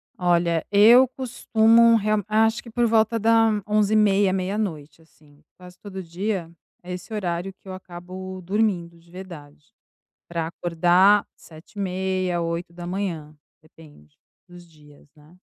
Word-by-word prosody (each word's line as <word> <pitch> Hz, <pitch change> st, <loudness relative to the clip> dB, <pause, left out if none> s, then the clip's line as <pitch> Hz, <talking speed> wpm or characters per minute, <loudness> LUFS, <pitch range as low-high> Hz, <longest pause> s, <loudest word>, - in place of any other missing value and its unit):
Olha, 170 Hz, -2 st, +1 dB
eu 230 Hz, +6 st, +7 dB
costumo 230 Hz, -2 st, +3 dB
real 215 Hz, -1 st, 0 dB
acho 220 Hz, +1 st, +1 dB
que 235 Hz, -, -12 dB
por 240 Hz, +1 st, 0 dB
volta 225 Hz, 0 st, +2 dB
da 225 Hz, +1 st, +3 dB, 0.2 s
23h30, 210 Hz, -2 st, +2 dB
meia-noite, 185 Hz, -5 st, -4 dB
assim. 150 Hz, -2 st, -25 dB
Quase 180 Hz, 0 st, -15 dB
todo 190 Hz, -2 st, -8 dB
dia, 180 Hz, +1 st, -4 dB, 0.3 s
é 180 Hz, +1 st, -7 dB
esse 180 Hz, +5 st, -9 dB
horário 180 Hz, -2 st, -3 dB
que 190 Hz, -, -24 dB
eu 185 Hz, -, -7 dB
acabo 185 Hz, +1 st, -9 dB
dormindo 180 Hz, -3 st, -2 dB
de 170 Hz, 0 st, -24 dB
verdade 155 Hz, -5 st, -12 dB, 0.5 s
pra 165 Hz, -1 st, -3 dB
acordar 175 Hz, +4 st, +2 dB
7h30, 185 Hz, +1 st, -4 dB
8, 170 Hz, -1 st, -5 dB, 0.3 s
depende 150 Hz, -, -19 dB, 0.3 s
dos 175 Hz, -1 st, -15 dB
dias, 150 Hz, -3 st, -20 dB
né. 155 Hz, +4 st, -21 dB
185 Hz, 125 wpm, -23 LUFS, 170-210 Hz, 0.5 s, eu